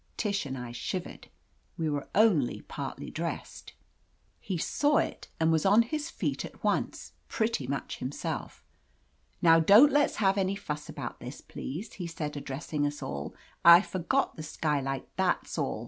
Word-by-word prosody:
Tish 200 -8 -1
and 135 0 -4
I 125 -1 -6
shivered. 175 +9 -5 0.5
We 165 -2 -1
were 145 -2 -2
only 190 - +3
partly - - -6
dressed. - - -5 0.7
He 190 -3 -3
saw 290 - +2
it - - -2
and 160 0 +3
was 160 -1 +2
on 205 +4 +6
his 305 +6 -3
feet - - -2
at - - -10
once, - - -1 0.2
pretty 220 - -1
much 140 0 -4
himself. 130 +3 -5 0.8
"Now 165 -1 +7
don't 210 - +7
let's 290 0 +3
have 195 -1 +2
any 190 +1 +1
fuss 150 -6 -5
about - - -6
this, - - -8
please," 170 - -7
he 175 -3 -5
said, 150 -3 -5
addressing 145 +1 -2
us 145 0 -5
all. 70 0 -5 0.3
"I 170 +1 +10
forgot 200 +11 0
the - - -5
skylight. 140 -4 -2
That's 185 -3 0
all. 140 -6 -1
165 Hz, 160 wpm, -29 LUFS, 145-200 Hz, 0.8 s, I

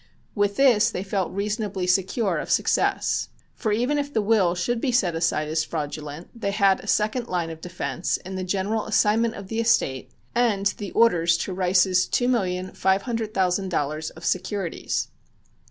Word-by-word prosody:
With 205 -1 +1
this 235 -4 +5
they 185 -4 -4
felt 195 -2 -2
reasonably 205 -1 -2
secure 190 +1 +1
of - - -6
success. - - +1 0.2
For 220 - -2
even 250 +7 +1
if 285 0 -3
the 230 - +1
will 200 -5 +3
should 230 +7 -1
be 265 - +1
set 195 -8 +2
aside 165 -2 0
as 155 +1 0
fraudulent 150 0 -5
they 230 -4 -3
had 200 -1 +3
a - - -11
second 220 +4 0
line 175 -4 -2
of 160 0 -10
defense 180 0 -2
in 190 +1 -9
the 185 0 -3
general 200 +4 -1
assignment 225 +2 +2
of 200 -1 -8
the 225 +3 -3
estate 140 - +1 0.2
and 225 -5 +1
the 205 -2 -4
orders 175 -7 +4
to 190 - -5
Rice's 185 0 +3
two 245 - +1
million 185 -6 0
five 190 +1 +1
hundred 225 -3 -3
thousand 190 0 +1
dollars 155 -1 -2
of 160 - -12
securities. 185 -1 -2
195 Hz, 175 wpm, -24 LUFS, 180-225 Hz, 0.2 s, this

